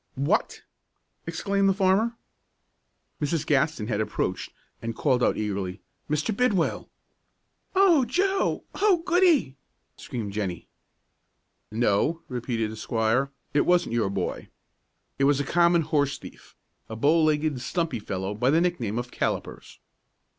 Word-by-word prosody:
"What!" 145 Hz, +11 st, 0 dB, 0.6 s
exclaimed 195 Hz, -1 st, +1 dB
the 195 Hz, -, +2 dB
farmer. 205 Hz, +4 st, +2 dB, 1.0 s
Mrs. 150 Hz, +1 st, -1 dB
Gaston 150 Hz, -4 st, +1 dB
had 110 Hz, -1 st, -1 dB
approached, 95 Hz, -3 st, -2 dB, 0.3 s
and 115 Hz, 0 st, -4 dB
called 130 Hz, -2 st, +1 dB
out -, -, +2 dB
eagerly, 100 Hz, -2 st, -3 dB, 0.3 s
"Mr. 150 Hz, +8 st, 0 dB
Bidwell!" 210 Hz, -8 st, 0 dB, 0.9 s
"O 370 Hz, -7 st, +5 dB
Joe! 380 Hz, -, 0 dB
Oh, 385 Hz, -5 st, +2 dB
goody!" 340 Hz, -, +3 dB, 0.4 s
screamed 110 Hz, -5 st, -5 dB
Jennie. 95 Hz, -5 st, -4 dB, 1.0 s
"No," 120 Hz, +9 st, +1 dB
repeated 120 Hz, -3 st, -2 dB
the 110 Hz, -, -8 dB
squire, 115 Hz, +4 st, 0 dB, 0.2 s
"it 145 Hz, -, +4 dB
wasn't 175 Hz, -9 st, +2 dB
your 115 Hz, -4 st, +1 dB
boy. 95 Hz, -2 st, -3 dB, 0.7 s
It 135 Hz, -, +4 dB
was 145 Hz, 0 st, +3 dB
a -, -, +1 dB
common 170 Hz, +3 st, +3 dB
horse 145 Hz, -2 st, 0 dB
thief, -, -, -14 dB, 0.3 s
a 110 Hz, -, -5 dB
bow 150 Hz, +8 st, +3 dB
legged, 150 Hz, -3 st, +1 dB
stumpy 165 Hz, -5 st, -2 dB
fellow 95 Hz, -1 st, -4 dB
by 125 Hz, +5 st, +1 dB
the 155 Hz, +4 st, +4 dB
nickname 140 Hz, -, -1 dB
of 120 Hz, 0 st, -4 dB
Callipers." -, -, -4 dB
145 Hz, 130 wpm, -26 LUFS, 115-180 Hz, 1.0 s, O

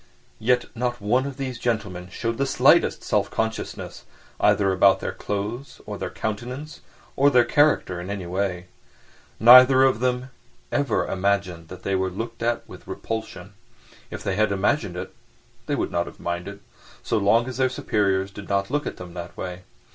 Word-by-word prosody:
Yet 125 Hz, +2 st, +2 dB
not 120 Hz, 0 st, -2 dB
one 125 Hz, +6 st, +1 dB
of 140 Hz, -1 st, -7 dB
these 130 Hz, -3 st, -4 dB
gentlemen 105 Hz, -7 st, -2 dB
showed 115 Hz, +5 st, -3 dB
the 140 Hz, -, +1 dB
slightest 135 Hz, -, +4 dB
self -, -, +1 dB
consciousness—either 110 Hz, -2 st, -2 dB
about 95 Hz, +1 st, +5 dB
their -, -, -3 dB
clothes 105 Hz, +7 st, -5 dB
or -, -, -6 dB
their -, -, -3 dB
countenance 125 Hz, +8 st, -5 dB, 0.3 s
or 140 Hz, +1 st, +5 dB
their 125 Hz, -3 st, +5 dB
character 145 Hz, -12 st, +2 dB
in 90 Hz, -, -7 dB
any 100 Hz, -3 st, -4 dB
way. 90 Hz, 0 st, -2 dB, 0.7 s
Neither 130 Hz, +3 st, +9 dB
of 130 Hz, -4 st, +3 dB
them 125 Hz, +1 st, -1 dB, 0.4 s
ever 140 Hz, -6 st, +1 dB
imagined 95 Hz, -3 st, -1 dB
that 90 Hz, +2 st, -11 dB
they 100 Hz, -, -1 dB
were 95 Hz, 0 st, +1 dB
looked 115 Hz, +5 st, -6 dB
at 120 Hz, 0 st, -1 dB
with -, -, -13 dB
repulsion; 110 Hz, -1 st, -6 dB, 0.6 s
if -, -, -7 dB
they 95 Hz, -, -1 dB
had 110 Hz, 0 st, +2 dB
imagined 100 Hz, -1 st, 0 dB
it -, -, -6 dB, 0.5 s
they -, -, 0 dB
would -, -, -2 dB
not 85 Hz, 0 st, -1 dB
have -, -, -11 dB
minded—so 90 Hz, +5 st, -5 dB
long 115 Hz, +4 st, +3 dB
as 130 Hz, -, -5 dB
their 130 Hz, -1 st, +2 dB
superiors 100 Hz, -5 st, 0 dB
did 100 Hz, 0 st, -10 dB
not 100 Hz, +3 st, 0 dB
look 145 Hz, +1 st, -1 dB
at -, -, -5 dB
them 90 Hz, -, -9 dB
in -, -, -14 dB
that 85 Hz, 0 st, -8 dB
way. 90 Hz, 0 st, -6 dB
105 Hz, 170 wpm, -24 LUFS, 95-125 Hz, 0.7 s, Neither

